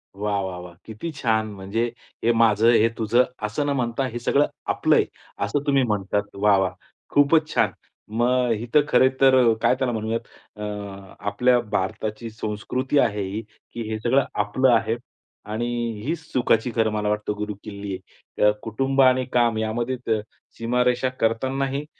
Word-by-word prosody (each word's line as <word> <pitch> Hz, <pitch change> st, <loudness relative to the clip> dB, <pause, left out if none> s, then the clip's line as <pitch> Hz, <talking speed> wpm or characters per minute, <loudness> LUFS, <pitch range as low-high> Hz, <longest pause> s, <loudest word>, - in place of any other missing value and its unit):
वाह, 100 Hz, 0 st, -1 dB
वाह, 95 Hz, -2 st, -4 dB
वाह! 90 Hz, -1 st, -10 dB
किती 115 Hz, +10 st, -6 dB
छान, 110 Hz, -5 st, +1 dB
म्हणजे 100 Hz, +4 st, -2 dB, 0.4 s
हे 120 Hz, -, +4 dB
माझं, 115 Hz, 0 st, +4 dB
हे 115 Hz, -1 st, +4 dB
तुझं 115 Hz, +3 st, +3 dB, 0.2 s
असं 105 Hz, +7 st, -1 dB
न -, -, 0 dB
म्हणता 120 Hz, +1 st, -1 dB
हे 120 Hz, -1 st, -5 dB
सगळं 140 Hz, +4 st, +2 dB, 0.3 s
आपलं -, -, +2 dB
आहे. -, -, +4 dB, 0.4 s
असं 145 Hz, -1 st, -2 dB
तुम्ही 140 Hz, -2 st, +4 dB
म्हणतात 105 Hz, -2 st, 0 dB
वाह, 100 Hz, 0 st, +4 dB
वाह! 95 Hz, -2 st, 0 dB, 0.4 s
खूपच 150 Hz, +2 st, +4 dB
छान. -, -, +2 dB, 0.5 s
मग 125 Hz, +1 st, +2 dB
इथं 120 Hz, +7 st, +2 dB
खरे 130 Hz, 0 st, +5 dB
तर 130 Hz, -3 st, +6 dB
काय -, -, +4 dB
त्याला 130 Hz, -1 st, -1 dB
म्हणूयात 110 Hz, +1 st, -1 dB, 0.4 s
अ, -, -, -6 dB, 0.6 s
आपल्या 120 Hz, +5 st, +2 dB
भारताची 110 Hz, +1 st, -3 dB
संस्कृती 110 Hz, +6 st, -2 dB
आहे 105 Hz, -5 st, +1 dB
ही, 105 Hz, +3 st, -3 dB, 0.3 s
की 120 Hz, -, -5 dB
हे 110 Hz, 0 st, -3 dB
सगळं 130 Hz, +4 st, +2 dB
आपलं 105 Hz, +6 st, +2 dB
आहे 115 Hz, 0 st, +1 dB, 0.6 s
आणि 110 Hz, +2 st, -1 dB, 0.4 s
हीच 165 Hz, +4 st, -1 dB
सुखाची 120 Hz, -1 st, +2 dB
खरं 110 Hz, -2 st, +2 dB
मला 105 Hz, -1 st, -1 dB
वाटतं 105 Hz, 0 st, -1 dB
गुरुकिल्ली 100 Hz, -1 st, -6 dB
आहे. 95 Hz, +2 st, -5 dB
अ, -, -, +6 dB
कुटुंब 135 Hz, +5 st, 0 dB
आणि 130 Hz, -1 st, +4 dB
काम 120 Hz, -2 st, +3 dB
यामध्ये 115 Hz, +4 st, -1 dB
त 110 Hz, -1 st, +2 dB, 0.4 s
सीमारेषा 125 Hz, +2 st, +1 dB
करतानाही 135 Hz, +5 st, 0 dB
115 Hz, 160 wpm, -23 LUFS, 105-130 Hz, 0.6 s, तर